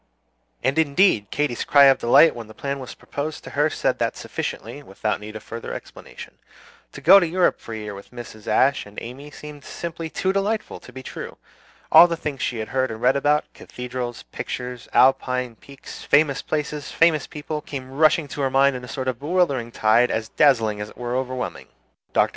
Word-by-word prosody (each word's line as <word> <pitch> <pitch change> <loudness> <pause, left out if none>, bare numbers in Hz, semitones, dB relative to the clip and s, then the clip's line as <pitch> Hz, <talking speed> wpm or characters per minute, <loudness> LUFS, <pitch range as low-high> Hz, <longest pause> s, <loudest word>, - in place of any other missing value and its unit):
And 135 +5 +1
indeed 140 - +3
Katy's 145 -4 -1
cry 140 -1 +6
of 135 -1 +6
delight 120 +7 +6
when 115 -2 -8
the 110 - -14
plan 140 0 -4
was 130 - -8
proposed 145 +1 -6
to - - -9
her 150 +2 +2
said - - -1
that - - -1
sufficiently, 120 +7 -5
without 105 -3 -3
need 105 +1 -9
of 110 - -8
further 115 0 -7
explanation. - - -11 0.5
To - - -9
go 195 +3 +8
to 175 - 0
Europe 180 +2 +1
for 115 - -9
a - - -5
year 105 -1 -6
with 100 0 -11
Mrs. 120 -3 -11
Ashe 135 -4 +2
and 105 - -16
Amy 135 +5 -9
seemed 150 -1 -11
simply 165 -1 -6
too 190 +4 -1
delightful 210 +2 -2
to - - -14
be 130 - -9
true. - - -8 0.5
All 175 - +9
the 170 -1 -3
things 150 -4 -5
she 120 - -1
had 110 -1 -5
heard 130 0 0
about 110 - -5
and 110 - -12
read 125 - +4
about 145 +2 +1
cathedrals, 125 -1 -6
pictures, 125 -1 -6
Alpine 125 -2 +2
peaks, 140 +3 -12
famous 145 -1 +3
places, 150 -1 -3
famous 165 -3 +3
people 150 0 -5
came 130 -3 -7
rushing 155 +3 +3
into 145 0 -6
her 135 - +1
mind 135 +1 +3
in 125 - -6
a - - -8
sort 130 +1 -5
of 125 -2 -2
bewildering 145 -7 0
tide 115 +3 +3
as 110 0 -2
dazzling 115 -8 +3
as 105 - -5
it - - -17
was 120 0 -4
overwhelming. 130 0 -3 0.4
Dr. - - +3
135 Hz, 205 wpm, -23 LUFS, 120-150 Hz, 0.5 s, All